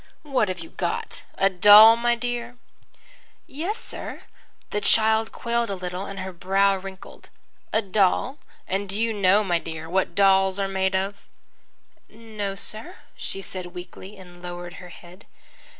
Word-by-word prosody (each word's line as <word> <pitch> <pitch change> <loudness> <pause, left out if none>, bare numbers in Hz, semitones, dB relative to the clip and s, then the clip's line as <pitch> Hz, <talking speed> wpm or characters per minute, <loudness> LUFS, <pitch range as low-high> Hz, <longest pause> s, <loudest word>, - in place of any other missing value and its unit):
"What 270 -8 +1
have 185 - -3
you 165 - -10
got, - - -4 0.2
a 195 - +4
doll, 205 +4 +8
my 240 0 +1
dear?" 240 0 -4 0.9
"Yes, 345 +10 -4
sir." - - -8 0.5
The 210 - -1
child 220 +1 +3
quailed 235 -1 -1
a 200 - -2
little, 180 +1 -5
and 195 -1 -6
her 190 0 -6
brow 195 +3 +2
wrinkled. 190 0 -10 0.4
"A 220 - +1
doll? 200 +8 +1 0.3
And 195 +1 -2
do 200 +2 -4
you 230 0 +1
know, 200 0 +3
my 175 -4 +1
dear, 160 -1 -7
what 180 0 -1
dolls 195 -1 +4
are 195 -1 0
made 190 0 0
of?" 195 +1 -3 0.8
"No, 215 -3 -6
sir," 220 - -4 0.2
she 195 - -3
said 185 0 -7
weakly, 185 +3 -10
and 175 -2 -14
lowered 175 0 -7
her 180 - -11
head. 175 +3 -15
195 Hz, 155 wpm, -24 LUFS, 185-220 Hz, 0.9 s, doll